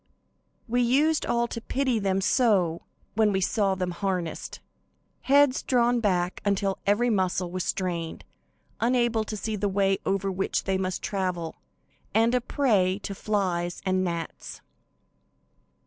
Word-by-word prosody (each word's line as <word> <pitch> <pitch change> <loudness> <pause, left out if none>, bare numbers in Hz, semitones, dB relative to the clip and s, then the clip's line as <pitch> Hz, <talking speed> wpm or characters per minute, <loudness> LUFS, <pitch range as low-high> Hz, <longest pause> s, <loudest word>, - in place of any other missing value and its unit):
We 245 +2 +1
used 290 +6 +2
all 235 0 +1
to 230 - -5
pity 255 -1 0
them 195 -1 0
so 190 -8 +2 0.3
when 215 -1 +3
we 190 - +1
saw 195 +1 +1
them 180 -1 -2
harnessed. 180 -2 -3 0.7
Heads 280 -1 +5
drawn 245 -1 +2
back 180 -5 0
until 195 -1 0
every 235 +4 +3
muscle 185 -3 0
was 185 0 -2
strained, 170 -3 -3 0.5
unable 235 -2 +2
to 215 0 -5
see 215 +2 -3
the 205 0 -1
way 195 0 +1
over 195 0 0
which 190 +1 -1
they 190 -1 0
must 185 -1 -3
travel, 180 -4 -2 0.6
and 225 +2 +4
a 250 - +2
prey 210 -9 +2
to 200 - -4
flies 185 -4 -1
and 185 0 +1
gnats! 170 -2 -5
195 Hz, 140 wpm, -26 LUFS, 185-235 Hz, 0.7 s, Heads